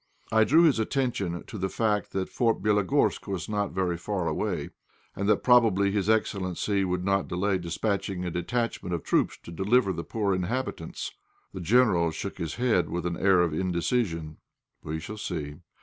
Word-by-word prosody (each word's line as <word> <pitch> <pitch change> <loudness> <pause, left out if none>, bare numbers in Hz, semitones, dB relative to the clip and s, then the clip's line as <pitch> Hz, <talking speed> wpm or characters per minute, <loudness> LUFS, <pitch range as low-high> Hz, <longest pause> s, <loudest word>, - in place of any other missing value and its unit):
I 110 0 +5
drew 160 +7 +5
his 145 -9 +4
attention 110 -8 -1
to 110 - -8
the 95 +1 -1
fact 105 -1 0
that 95 -1 -1
Fort 115 -2 +1
Bélogorsk 105 -4 +2
was 95 -3 -3
not 105 -1 -1
very 90 -2 -1
far 95 -1 -2
away, - - -2 0.4
and 100 +1 -1
that - - +3
probably 110 -6 +4
his 100 0 0
excellency 100 -2 0
would 90 -1 -1
not 100 -1 +1
delay 95 +1 0
dispatching 90 +1 -2
a 90 - -2
detachment 90 0 -2
of 85 - -5
troops - - +1
to - - -9
deliver 95 +4 +2
the 85 - -4
poor 100 -1 -1
inhabitants. 95 -1 -3 0.4
The 95 - -6
General 90 -4 +4
shook 95 +5 -6
his 85 -2 -3
head 120 -7 +1
with 85 0 -3
an 85 -1 -1
air 95 0 +4
of 85 -3 +1
indecision 85 -2 -1 0.4
"We 80 +1 -4
shall 105 +7 -7
see! 75 -8 -4
95 Hz, 175 wpm, -27 LUFS, 85-110 Hz, 0.4 s, I